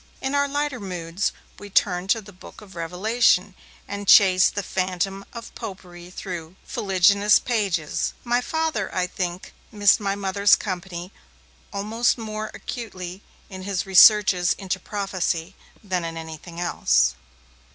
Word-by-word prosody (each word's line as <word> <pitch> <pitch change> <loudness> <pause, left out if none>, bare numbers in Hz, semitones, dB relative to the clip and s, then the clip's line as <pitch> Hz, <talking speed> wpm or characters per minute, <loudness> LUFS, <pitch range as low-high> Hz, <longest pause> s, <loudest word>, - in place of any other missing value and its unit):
In 265 +1 -3
our 285 0 +2
lighter 285 -2 -2
moods, 180 -1 -3 0.3
we 205 - -10
turned 185 -1 +1
to 225 +2 +2
the 205 0 -14
'Book 180 - -14
of 195 -3 -14
Revelation', 185 +3 +1 0.3
and 200 0 -6
chased 185 -2 +6
the 205 - -2
phantom 190 +1 -2
of 235 -1 -9
Popery 180 -5 -9
through 175 -2 -7
its - - -16
fuliginous 200 +1 +4
pages. 195 -10 -1
My 245 0 +1
Father, 315 -8 -2
I 185 -1 +1
think, 180 0 -5 0.2
missed 205 -3 +4
my 200 -1 -1
Mother's 200 +1 +3
company 180 -1 -6 0.6
almost 220 +5 0
more 215 -1 -5
acutely 190 -6 -7 0.3
in 190 -2 -9
his 190 -1 -2
researches 190 -1 +6
into 190 -1 -4
prophecy 185 -3 -3 0.3
than 185 -3 -2
in 165 0 -5
anything 160 +1 -9
else. 65 - +2
195 Hz, 140 wpm, -23 LUFS, 180-210 Hz, 0.6 s, chased